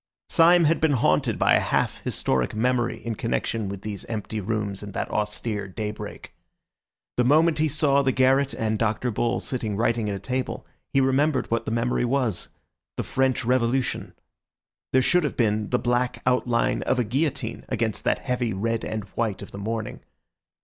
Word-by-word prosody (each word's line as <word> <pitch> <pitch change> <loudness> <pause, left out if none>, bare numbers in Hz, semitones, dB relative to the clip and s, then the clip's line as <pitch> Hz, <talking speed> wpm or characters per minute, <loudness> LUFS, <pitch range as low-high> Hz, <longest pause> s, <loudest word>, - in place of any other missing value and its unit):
Syme 170 +1 +6
had 165 +1 +2
been 160 -2 +3
haunted 125 - +2
by - - +4
a - - +6
half - - 0
historic 65 - -1
memory 120 +1 0
in 115 - -1
connection 115 -1 -2
with 100 0 -7
these 105 -3 -5
empty 110 -1 -4
rooms 105 -1 -2
and 100 -1 -8
that - - -3
austere 105 -1 -2
daybreak. 105 +2 -6 0.8
The 125 - +4
moment 155 +5 +4
he 155 - +3
saw 140 -1 +2
the 135 -1 +2
garret 130 +2 +3
and 110 -1 -1
Dr. 110 +2 0
Bull 120 +3 0
sitting 110 -6 -3
writing 115 -1 +1
at 100 - -2
a - - -5
table, 130 +6 -3 0.3
he 135 - +3
remembered 135 +1 +1
what 115 0 0
the - - -3
memory 115 +2 0
was—the 120 -6 -3
French 130 -3 0
Revolution. 125 +1 0 0.8
There 130 0 +4
should 180 +5 +3
have 145 - -2
been 105 -3 +1
the 125 - +2
black 120 +1 0
outline 120 -2 +1
of 130 - 0
a 125 - +2
guillotine 125 -1 -2
against 115 -4 -1
that - - +2
heavy 125 -4 0
red 115 +4 -1
and 110 -1 -3
white 110 -3 -2
of - - -11
the 100 - -8
morning. 110 +1 -4
115 Hz, 175 wpm, -25 LUFS, 110-130 Hz, 0.8 s, Syme